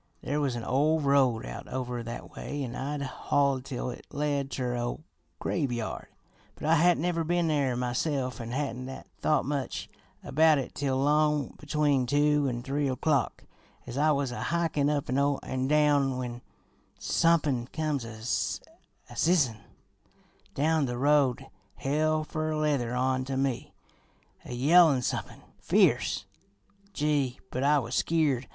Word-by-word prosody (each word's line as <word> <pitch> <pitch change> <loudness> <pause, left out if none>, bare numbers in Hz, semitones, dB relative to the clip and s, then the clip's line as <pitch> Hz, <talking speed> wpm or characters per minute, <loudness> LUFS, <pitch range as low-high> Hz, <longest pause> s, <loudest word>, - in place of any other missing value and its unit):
There 145 +2 -1
was 135 -4 0
an 120 - -4
ol' 150 +6 +2
road 140 -5 +2
out - - -7
over 125 -2 -3
that 120 +1 -7
way, 145 -1 -4
an' 120 -2 -5
I'd 140 +2 -3
hoid 135 0 0
tell 125 -1 -4
it - - -11
led 145 -2 -1
ter 125 -3 -2
a 120 - -2
ol' 120 +5 -3 0.4
graveyard, 120 -9 -2 0.5
but - - -8
I 160 - +4
hadn't 170 0 +3
never 170 -2 0
been 175 +1 +1
there 140 -5 +1
myself 125 +1 -1
an' 115 - -6
hadn't 130 -1 -3 0.3
thought 150 -3 +2
much 140 -2 -3 0.4
about 155 +1 +4
it 135 - -4
till 135 -2 -1
'long 150 0 +2
between 145 -3 +1
two 145 +1 +3
an' 120 -1 -4
three 140 +2 -1
o'clock, 135 0 0 0.4
as 120 - -7
I 150 +3 +3
was 140 -3 +1
a 125 - -4
hikin' 165 -4 +1
up 145 -2 -1
an 135 -1 0
down, 145 -3 +3
when 125 -1 -5 0.6
somepin' 150 -8 +2
comes 150 -3 -2
a 110 -1 -9 0.9
zizzin' 150 -10 +2 1.0
down 155 0 +2
the 120 0 -3
road 140 -2 +3 0.3
hell 155 +3 0
fer 155 0 -2
leather 140 -6 0
on 130 +1 +1
to 135 0 -3
me, 135 -3 -1 0.7
a - - -6
yellin' 145 0 +5
somepin' - - -4 0.2
fierce. - - +2 0.7
Gee, 145 -7 0
but 130 - -2
I 145 +2 +4
was 120 -3 -3
skeered! 145 -7 +1
140 Hz, 145 wpm, -28 LUFS, 125-150 Hz, 1.0 s, yellin